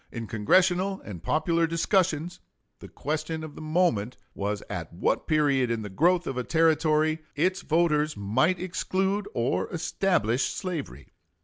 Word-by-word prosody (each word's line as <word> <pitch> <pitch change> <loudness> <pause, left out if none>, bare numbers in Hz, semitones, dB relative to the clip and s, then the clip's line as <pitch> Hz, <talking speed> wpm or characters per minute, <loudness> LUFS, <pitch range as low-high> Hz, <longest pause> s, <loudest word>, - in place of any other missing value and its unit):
In 115 -2 -5
Congressional 180 - +2
and 95 -6 -8
popular 165 - +1
discussions 170 0 0 0.4
the - - -10
question 155 +2 -4
of 155 -2 -8
the - - -10
moment 155 - 0 0.2
was 100 +1 -3
at - - -5
what - - -1
period 140 -5 +2
in 115 -2 -2
the 105 - -7
growth 175 - +2
of 135 - -4
a 125 - -1
Territory 155 0 +2 0.2
its 185 +6 +1
voters 155 -4 +1
might 130 - +1
exclude 190 +2 -1
or 120 +3 0
establish 165 - 0
slavery. 145 - -5
155 Hz, 140 wpm, -27 LUFS, 125-175 Hz, 0.4 s, Congressional